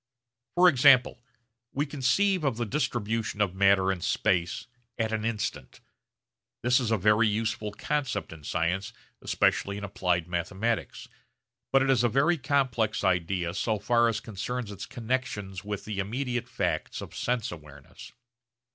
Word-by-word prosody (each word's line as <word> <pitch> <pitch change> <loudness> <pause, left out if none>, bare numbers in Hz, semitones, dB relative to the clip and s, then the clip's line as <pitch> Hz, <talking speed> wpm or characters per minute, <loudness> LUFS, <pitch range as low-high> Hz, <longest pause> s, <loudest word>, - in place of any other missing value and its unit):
For 180 +1 +6
example 130 -5 +5 0.5
we 145 +2 0
conceive 155 +7 +1
of 135 -6 0
the 120 - -1
distribution 115 -4 -2
of 100 -4 +1
matter 95 0 +4
in 95 -2 -4
space 85 +2 0 0.3
at 110 -1 -1
an 110 -1 -1
instant. 105 - -3 0.8
This 125 +2 +4
is 120 -4 -1
a 110 - +2
very 105 +3 +4
useful 110 0 -1
concept 120 - -2
in 80 -2 -13
science 85 +5 -1 0.3
especially 100 0 +1
in 100 - -7
applied 90 -4 -1
mathematics; 95 +6 -2 0.6
but 135 0 +5
it 135 - +3
is 125 -3 +3
a 120 - +3
very 150 +8 +2
complex 120 -5 0
idea 90 -1 0
so 110 +3 0
far 120 +3 +3
as 115 - 0
concerns 110 +2 -5
its 100 0 -7
connexions 110 -6 -3
with 105 -1 -5
the 105 -2 -4
immediate 120 +4 -2
facts 80 -3 -2
of - - -9
sense 120 -2 -1
awareness. 75 -4 -12
110 Hz, 145 wpm, -28 LUFS, 95-125 Hz, 0.8 s, For